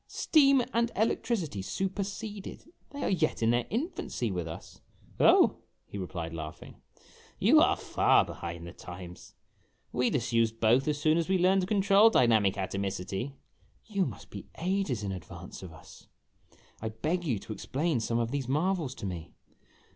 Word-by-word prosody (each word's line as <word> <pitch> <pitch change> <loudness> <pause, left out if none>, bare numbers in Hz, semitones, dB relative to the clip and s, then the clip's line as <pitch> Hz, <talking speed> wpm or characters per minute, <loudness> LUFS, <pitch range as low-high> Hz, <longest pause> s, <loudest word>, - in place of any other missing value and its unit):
"Steam 275 -4 +4
and 235 0 +1
electricity 205 - 0
superseded? 200 - -4 0.2
They 285 0 -6
are - - +1
yet 160 -9 0
in 115 - +4
their 120 0 +1
infancy 230 - -2
with 90 -3 -3
us! 80 - -10 0.2
" - - -27
"Oh," - - +5 0.3
he 100 - -7
replied, 85 -3 -5
laughing, 80 -2 -8 0.6
"you - - +6
are - - +4
far - - +3
behind 85 0 -7
the 85 - -9
times. 90 0 -10 0.6
We 125 0 +1
disused 115 -4 0
both 120 +5 +3
as 150 -1 0
soon 155 +2 +3
as 170 - -2
we 190 - +3
learned 185 +2 +4
to 180 - -2
control 200 +1 +5
dynamic 110 - +3
atomicity." 95 +4 -3 0.3
" - - -36
You 195 -3 +2
must - - -10
be - - -8
ages 180 - -1
in 100 - -2
advance 90 -3 -9
of 95 -3 -9
us. 80 - -15 0.7
I 110 - -2
beg 155 +11 -2
you 130 -10 0
to 110 - -7
explain 140 - -1
some 115 +1 -1
of 115 0 -1
these 140 -3 -2
marvels 155 -1 0
to 105 - -7
me." 85 -3 -6
125 Hz, 165 wpm, -29 LUFS, -, 0.7 s, you